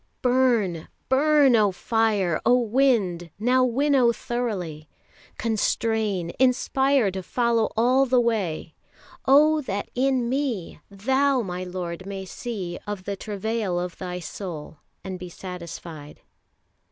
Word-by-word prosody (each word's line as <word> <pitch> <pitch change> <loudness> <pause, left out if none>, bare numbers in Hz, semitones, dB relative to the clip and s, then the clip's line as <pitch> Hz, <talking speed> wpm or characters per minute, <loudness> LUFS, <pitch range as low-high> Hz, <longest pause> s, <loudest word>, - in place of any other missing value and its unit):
Burn, 240 -10 +2 0.2
burn, 280 -1 +5
O 210 -3 +4
Fire, 205 -4 0
O 250 - +5
Wind, 225 -8 +1
now 250 +5 +3
winnow 255 0 +3
throughly! 195 -12 -4 0.5
Constrain, 220 -4 0
inspire 260 -2 +2
to 190 0 -4
follow 235 +3 +1
all 255 +4 +4
the 255 0 +4
way! 200 -9 -1 0.5
Oh 305 +3 +5
that 200 -7 -4
in 255 -1 +1
me 250 -8 -2
Thou, 265 +6 +1
my 180 -2 -4
Lord, 180 0 -5
may 195 -1 -5
see 190 -4 -5
Of 205 -2 -4
the 200 +1 -3
travail 205 -2 -2
of 180 -1 -5
Thy 180 -1 -4
soul, 160 -3 -7 0.2
And 185 -1 -6
be 180 0 -7
satisfied. 170 -4 -9
220 Hz, 120 wpm, -24 LUFS, 180-250 Hz, 0.5 s, burn